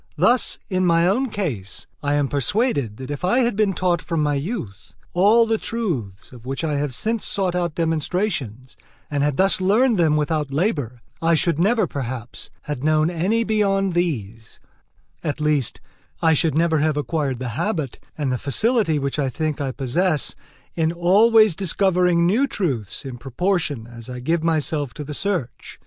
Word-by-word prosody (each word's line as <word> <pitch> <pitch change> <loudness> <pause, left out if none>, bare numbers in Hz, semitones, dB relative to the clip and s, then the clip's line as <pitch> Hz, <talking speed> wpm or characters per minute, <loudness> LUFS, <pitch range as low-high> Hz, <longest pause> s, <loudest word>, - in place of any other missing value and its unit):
Thus, 245 0 +3
in 185 -2 0
my 170 -1 +4
own 245 +9 +1
case, 135 - -4 0.2
I 145 0 0
am 145 -1 +1
persuaded 145 - 0
that 130 +1 -7
if 145 - -5
I 240 +9 +3
had 240 -3 +1
been 205 -2 +2
taught 175 -3 0
from 160 +1 -1
my 150 0 +1
youth 140 - -5 0.2
all 210 +6 +5
the 225 -1 0
truths 135 - -4
of 120 -3 -13
which 135 +4 -4
I 155 -2 0
have 145 -1 -1
since 220 - -1
sought 190 -3 -1
out 175 -3 -1
demonstrations, 160 - -2 0.4
and 145 -1 0
had 145 -1 +1
thus 190 0 +3
learned 215 +3 +3
them 155 -3 +3
without 150 -1 0
labour, 140 - -1 0.2
I 165 0 +3
should 165 0 +1
never, 215 +5 +3
perhaps, 125 -3 -6
have 145 -4 -4
known 155 +2 +2
any 190 +7 +1
beyond 195 -3 +1
these; 115 - -3 0.6
at 150 -1 -2
least, 150 -4 0 0.4
I 160 -1 +4
should 155 -1 +1
never 160 -1 +2
have 155 0 +1
acquired 145 -2 -1
the 125 0 -4
habit 150 - -2 0.2
and 145 -4 -1
the 125 - -1
facility 200 - +1
which 140 +1 -2
I 135 -2 +1
think 155 +2 -2
I 135 -2 -1
possess 145 +5 0 0.4
in 160 -1 +1
always 205 +4 +5
discovering 180 -2 +2
new 225 +11 +3
truths 135 - -3
in 125 -2 -7
proportion 145 - -1
as 120 0 -11
I 125 0 -6
give 160 +6 0
myself 150 -5 0
to 150 - -5
the 150 +1 -6
search. 165 - -3
160 Hz, 175 wpm, -22 LUFS, 135-190 Hz, 0.6 s, all